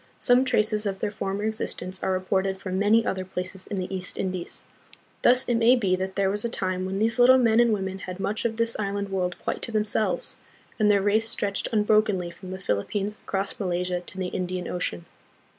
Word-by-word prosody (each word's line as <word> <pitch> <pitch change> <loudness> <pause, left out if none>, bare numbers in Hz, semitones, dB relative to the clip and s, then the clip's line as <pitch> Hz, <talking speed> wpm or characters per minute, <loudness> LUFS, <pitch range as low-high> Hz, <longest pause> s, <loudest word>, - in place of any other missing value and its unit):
Some 250 +1 +4
traces 215 -3 +1
of 195 -1 -2
their 205 - -2
former 200 0 -3
existence 190 -4 -3
are 190 - 0
reported 190 +1 0
from 190 -1 -3
many 220 +3 +4
other 190 -1 -1
places 185 0 -6
in 200 - -4
the 185 +1 -3
East 185 -1 -5
Indies. 185 -2 -4 0.6
Thus 250 +1 +4
it 240 - +2
may 230 +2 +6
be 195 -7 +1
that 190 +1 -4
there 195 -1 +2
was 205 +1 -3
a 235 - -1
time 185 -4 -2
when 190 +1 -3
these 225 +3 +1
little 255 +2 +8
men 230 -3 +4
and 240 -1 +5
women 190 -2 -2
had 185 0 -7
much 210 +3 -2
of 225 -1 -1
this 230 0 +2
island 200 -1 -2
world 180 -2 -1
quite - - -4
to - - -2
tlu'inselves, 215 0 0 0.4
and 210 -1 +4
their 200 -2 +4
race 220 +2 +2
stretched 200 -4 -1
unbrokenly 210 -4 +2
from 180 +2 -11
the 185 - -5
Philippines 195 - -2
across 195 0 -3
Malaysia 180 -2 -1
to 185 - -8
the 185 -1 -2
Indian 180 0 -3
Ocean. 90 - -3
195 Hz, 210 wpm, -26 LUFS, 185-215 Hz, 0.6 s, little